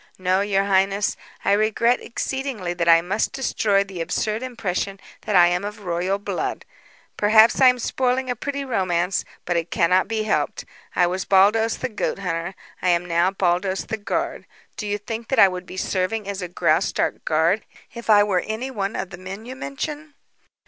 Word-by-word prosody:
No, 185 +1 +1
your 200 -1 +1
highness, 195 +1 +1 0.3
I - - +3
regret 220 +4 +2
exceedingly 250 -8 -3
that 170 -1 0
I 165 0 +7
must 195 +5 -1
destroy 210 -6 +1
the 195 -3 -7
absurd 215 +6 -1
impression 200 -6 -3 0.3
that 210 - 0
I 175 -1 +8
am 175 +2 -1
of 210 +1 -6
royal 180 +3 0
blood. 200 - -4 0.5
Perhaps 220 +4 +5
I 260 - +8
am 250 0 +5
spoiling 255 +1 0
a 245 - -1
pretty 280 +3 -4
romance, 185 -6 0 0.2
but 175 -1 0
it 165 0 -2
cannot 180 +2 +2
be 220 0 -1
helped. 215 - -1 0.3
I 180 - +4
was 180 +1 -2
Baldos, 210 +4 +4
the 255 - -2
goat 215 - -2
hunter; 180 -1 -3 0.3
I 180 - +1
am 175 0 +2
now 170 +1 +2
Baldos, 190 0 0
the 220 - -3
guard. 205 - -3 0.3
Do 210 - -5
you 205 0 -1
think 225 +2 -6
that 265 - -1
I 195 - +8
would 180 -1 -6
be 185 - -9
serving 195 +3 -1
as 200 -1 -4
a 180 - -3
Graustark 180 - 0
guard - - +2 0.3
if 235 -1 -9
I 205 -1 +7
were 195 -3 +1
any 225 +5 -3
one 200 -4 -3
of 185 - -4
the 175 - -9
men 195 +4 -8
you 255 +2 -7
mention?" 295 +2 -6
200 Hz, 190 wpm, -23 LUFS, 185-225 Hz, 0.5 s, I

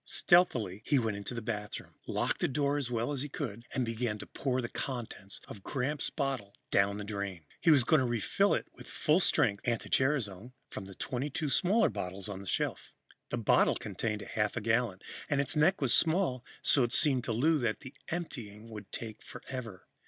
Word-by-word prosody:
Stealthily, 120 - +3
he 145 - +2
went 110 -5 +1
into 100 +4 -5
the 115 - -4
bathroom, 105 -2 -5
locked - - 0
the - - +3
door 145 +1 +1
as 130 -4 -1
well 120 +2 -1
as 140 -3 -1
he 145 - -3
could 115 -6 -5
and 130 - 0
began 115 -1 -2
to - - -8
pour 130 -2 -1
the 120 - -1
contents 120 -7 -5
of 100 - -9
Gramps' 140 +6 -2
bottle 135 -9 -3 0.2
down 100 +1 +3
the 105 - -4
drain. 100 -5 -4
He 170 - +3
was 145 -5 +7
going 155 +5 +4
to 130 - +1
refill 120 - +2
it - - -2
with - - -13
full 155 +3 +2
strength 100 - +3
anti 120 -2 -1
gerasone 125 -5 +1 0.2
from 95 - -6
the 95 0 -11
22 140 - -2
smaller 195 +10 +3
bottles 95 +2 -4
on 100 -2 -5
the 100 - -9
shelf. - - -1 0.4
The - - -1
bottle - - +4
contained 105 -2 -3
a - - -9
half 105 -2 -1
gallon, 115 -4 +1 0.3
and 145 -2 +2
its 140 +2 0
neck 160 +5 +4
was 135 -4 +3
small, 160 -7 +2 0.2
so 140 - +4
it 120 0 +1
seemed 135 -6 +4
to - - -1
Lou 150 +8 +3
that 115 -4 -1
the 130 0 -9 0.2
emptying 115 -11 -5
would 105 -2 -9
take 110 -1 -6
forever. 115 -8 -8
120 Hz, 200 wpm, -32 LUFS, 105-140 Hz, 0.4 s, was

